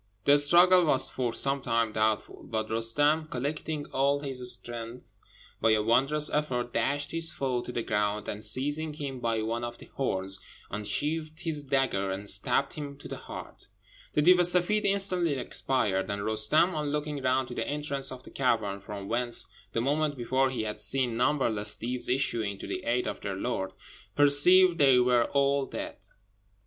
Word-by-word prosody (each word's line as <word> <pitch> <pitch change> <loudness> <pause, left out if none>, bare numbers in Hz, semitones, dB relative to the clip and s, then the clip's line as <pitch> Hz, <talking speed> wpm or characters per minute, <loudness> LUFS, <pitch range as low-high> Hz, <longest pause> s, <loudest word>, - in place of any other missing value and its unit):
The 145 +1 +6
struggle 175 +4 +6
was 135 -3 +3
for 125 -2 -2
some 135 +3 0
time 115 -2 0
doubtful; 110 0 -1
but 110 -1 -3
Roostem, 145 +8 +1
collecting 145 +3 -4
all 140 +2 +2
his 125 -3 -1
strength, 120 +1 -7 0.4
by 115 - +4
a 105 -1 +2
wondrous 135 +7 +2
effort 125 -5 -2
dashed 145 +5 -1
his 165 0 +2
foe 130 -3 -2
to 125 - -7
the 120 - -3
ground, 105 -1 -1
and 105 +1 -5
seizing 145 +5 +1
him 140 -3 -6
by 115 -2 -1
one 115 +2 -3
of 120 0 -5
the - - -13
horns, 95 -7 -1 0.3
unsheathed 155 - -3
his 160 -4 -2
dagger 135 -8 0
and 100 +2 -3
stabbed 135 +7 +1
him 145 -2 -7
to - - -11
the - - -6
heart. - - -10 0.5
The 150 - +2
Deev 180 +2 +6
e - - +5
Seffeed 180 +4 +2
instantly 185 -5 +2
expired; 125 -7 -1
and 100 0 -3
Roostem, 110 +12 +2
on 150 -2 -2
looking 150 -1 -3
round 130 0 0
to - - -6
the - - -3
entrance 140 -2 -2
of 130 -1 -9
the - - -14
cavern, 110 -7 -1
from 100 -1 -8
whence 120 +2 +1 0.3
the 115 - 0
moment 145 +2 0
before 130 +2 +1
he 130 -4 -3
had 105 0 -4
seen 120 +3 +1
numberless 115 -5 0
Deevs 125 +2 +1
issuing 115 -6 0
to - - -8
the - - -5
aid 125 +1 0
of - - -5
their 100 -2 -4
lord, 95 -2 -3 0.4
perceived 170 +5 +5
they 135 -3 +6
were 125 -1 +3
all 140 -1 +1
dead. - - -6
130 Hz, 180 wpm, -28 LUFS, 115-145 Hz, 0.5 s, The